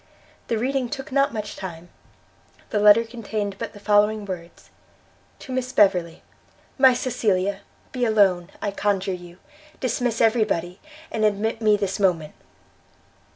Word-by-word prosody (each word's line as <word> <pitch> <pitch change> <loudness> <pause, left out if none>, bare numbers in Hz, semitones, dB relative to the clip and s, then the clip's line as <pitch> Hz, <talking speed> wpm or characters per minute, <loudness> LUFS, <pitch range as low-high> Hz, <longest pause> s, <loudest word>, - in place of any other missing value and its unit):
The 230 - 0
reading 255 +1 -1
took 270 +2 -6
not 275 +1 +2
much 210 -1 -5
time; 175 -2 -8 0.8
the 210 - +1
letter 210 +2 +7
contained 215 -4 -4
but - - -5
the 205 - -12
following 210 +1 +2
words: 175 -3 -9 0.7
To - - -10
Miss 255 0 -2
Beverley. 180 -7 +2 0.6
MY 260 -2 +7
CECILIA! 200 -6 0 0.3
Be 250 -2 -3
alone, 195 -5 +3
I 205 - -1
conjure 195 -1 -1
you; 175 -1 -10 0.4
dismiss 245 -2 -1
every 225 0 +4
body, 175 -2 -3 0.3
and 220 - -1
admit 215 +2 0
me 215 -1 +4
this 200 0 -2
moment! 170 -6 +1
210 Hz, 140 wpm, -23 LUFS, 190-230 Hz, 0.8 s, letter